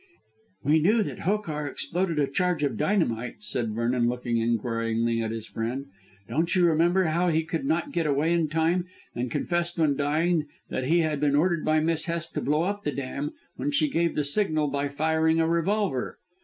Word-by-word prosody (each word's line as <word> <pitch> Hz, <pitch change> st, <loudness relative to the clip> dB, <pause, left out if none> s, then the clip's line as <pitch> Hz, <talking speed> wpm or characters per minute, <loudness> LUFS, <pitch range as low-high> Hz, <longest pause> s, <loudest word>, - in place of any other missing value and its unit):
"We 150 Hz, +3 st, +4 dB
knew 210 Hz, +8 st, +3 dB
that -, -, -6 dB
Hokar 165 Hz, -7 st, -1 dB
exploded 170 Hz, +4 st, -2 dB
a 145 Hz, -, +3 dB
charge 175 Hz, +2 st, 0 dB
of 140 Hz, -5 st, 0 dB
dynamite," 120 Hz, -, 0 dB
said 110 Hz, +1 st, -2 dB
Vernon 120 Hz, +1 st, +1 dB
looking 120 Hz, -1 st, -2 dB
inquiringly 115 Hz, 0 st, 0 dB
at 110 Hz, -, -2 dB
his 115 Hz, -1 st, -5 dB
friend. 120 Hz, +6 st, -4 dB, 0.4 s
"Don't 165 Hz, +4 st, 0 dB
you 180 Hz, -1 st, +4 dB
remember 170 Hz, +3 st, +3 dB
how 170 Hz, +2 st, +1 dB
he 160 Hz, 0 st, +2 dB
could 165 Hz, -, -3 dB
not 290 Hz, -1 st, 0 dB
get 165 Hz, -, 0 dB
away 150 Hz, +4 st, +2 dB
in 165 Hz, -3 st, +1 dB
time, 165 Hz, +3 st, +1 dB, 0.3 s
and 120 Hz, +1 st, -3 dB
confessed 175 Hz, +7 st, -1 dB
when 155 Hz, -4 st, +2 dB
dying 155 Hz, +3 st, +1 dB, 0.2 s
that 130 Hz, -, -2 dB
he 170 Hz, +5 st, +3 dB
had 155 Hz, -3 st, 0 dB
been 145 Hz, -1 st, +2 dB
ordered 170 Hz, +1 st, +2 dB
by 155 Hz, 0 st, +2 dB
Miss 160 Hz, 0 st, 0 dB
Hest 170 Hz, -1 st, -3 dB
to -, -, -2 dB
blow 150 Hz, +3 st, +1 dB
up 205 Hz, +3 st, -2 dB
the 145 Hz, -, -1 dB
dam 140 Hz, +2 st, -4 dB, 0.2 s
when 290 Hz, -, -1 dB
she 295 Hz, +1 st, +2 dB
gave 170 Hz, -4 st, +1 dB
the 150 Hz, -, +1 dB
signal 155 Hz, -1 st, +1 dB
by 140 Hz, +1 st, -1 dB
firing 160 Hz, +3 st, +1 dB
a 160 Hz, -, +3 dB
revolver." 170 Hz, -3 st, 0 dB
155 Hz, 195 wpm, -26 LUFS, 135-170 Hz, 0.4 s, We